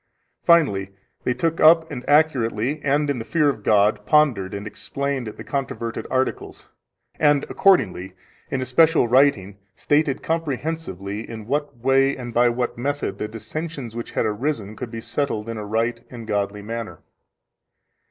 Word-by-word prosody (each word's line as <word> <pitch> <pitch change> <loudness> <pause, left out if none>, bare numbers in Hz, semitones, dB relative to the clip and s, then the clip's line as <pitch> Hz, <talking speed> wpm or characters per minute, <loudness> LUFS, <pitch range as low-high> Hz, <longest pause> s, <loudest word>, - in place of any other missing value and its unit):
Finally 140 - +3 0.4
they 125 - +2
took 165 -1 -1
up 160 +1 +6
and 125 - -5
accurately 145 -3 +2
and 145 +1 +1
in 140 -3 -1
the - - -4
fear 150 +4 +2
of 120 -6 -3
God 105 0 +3
pondered 125 - +3
and 100 +1 -6
explained 140 +3 -3
the 105 - -8
controverted 130 -4 -4
articles, 130 0 -2 0.5
and 145 -2 +4
accordingly 95 - +2 0.4
in 130 - -2
a - - -2
special 155 +2 +4
writing 115 -7 +3 0.2
stated 145 -2 +1
comprehensively 145 - -3
in 110 -2 -7
what 145 +1 -2
way 135 +3 +2
and 120 -2 -7
by 120 +1 +4
what 120 0 -2
method 145 +3 -2
the 105 - -2
dissensions 125 +2 -6
which 120 - -6
had - - 0
arisen 110 -1 -2
could 125 +2 -6
be 115 0 -6
settled 115 -5 -2
in 115 -1 -4
a 105 - -5
right 115 +2 -1
and 120 -2 -9
godly 105 -1 -2
manner. 110 -6 -6
125 Hz, 155 wpm, -22 LUFS, 110-145 Hz, 0.5 s, up